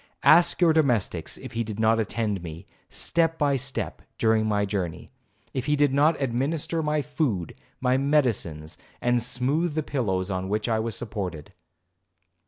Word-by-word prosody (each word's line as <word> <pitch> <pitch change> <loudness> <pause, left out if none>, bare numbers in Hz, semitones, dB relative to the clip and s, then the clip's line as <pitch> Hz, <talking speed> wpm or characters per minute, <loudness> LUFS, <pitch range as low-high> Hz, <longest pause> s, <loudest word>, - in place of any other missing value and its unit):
Ask 170 +3 +5
your 165 -2 +6
domestics 120 - +1
if - - -9
he 115 0 -1
did 110 -1 -6
not 110 +1 +3
attend 105 -2 -1
me, 85 +2 -8 0.2
step 165 -1 +1
by 145 -3 +2
step, 135 0 -3 0.2
during 110 -1 +2
my 105 -1 +1
journey? 95 -5 -4 0.4
If 130 +1 -3
he 150 - +3
did 145 -2 +2
not 150 +3 +3
administer 140 +6 -1
my 150 -1 0
food, 135 - -2 0.3
my 130 0 +2
medicines, 120 - 0 0.2
and 120 0 +2
smoothe 135 +7 0
the 155 - 0
pillows 100 -10 -1
on 95 0 -3
which 105 +2 -1
I 110 -2 +1
was 110 0 -2
supported?' 95 -9 -5
120 Hz, 160 wpm, -26 LUFS, 105-145 Hz, 0.4 s, your